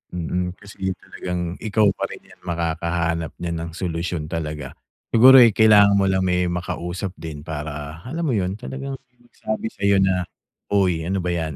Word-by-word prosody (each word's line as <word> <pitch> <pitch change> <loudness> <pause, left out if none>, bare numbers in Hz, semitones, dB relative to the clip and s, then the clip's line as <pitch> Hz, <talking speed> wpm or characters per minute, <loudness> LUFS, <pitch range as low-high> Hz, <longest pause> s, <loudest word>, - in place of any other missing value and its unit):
Mm. 90 +1 -2
Kasi, 105 +1 -14
ganiyang 95 -1 -2
talagang 90 -1 -4 0.2
ikaw 110 -1 +2
pa - - -3
rin - - -10
'yan, - - -19
makakahanap 85 -1 -1
niyan 85 -1 -2
ng 85 0 -5
solusyon 85 -2 -3
talaga. 75 -4 -4 0.4
Siguro, 130 +4 +8
eh, 115 - +6
kailangan 105 -2 +6
mo 95 - +3
lang 95 0 +1
may 90 -1 +1
makausap 90 +1 -3
din 75 -3 -7
para, 75 0 -6
alam 165 +5 -3
mo 145 - +1
'yon, 95 0 -1
talagang 135 +4 -6
may 125 -1 -42
magsabi 110 -1 -4
sayo 100 0 +2
na, 95 -1 +2 0.5
"Uy, 90 -5 +2
ano 95 +3 -1
ba 90 0 -1
'yan." 80 -4 -2
90 Hz, 175 wpm, -22 LUFS, 85-100 Hz, 0.5 s, Siguro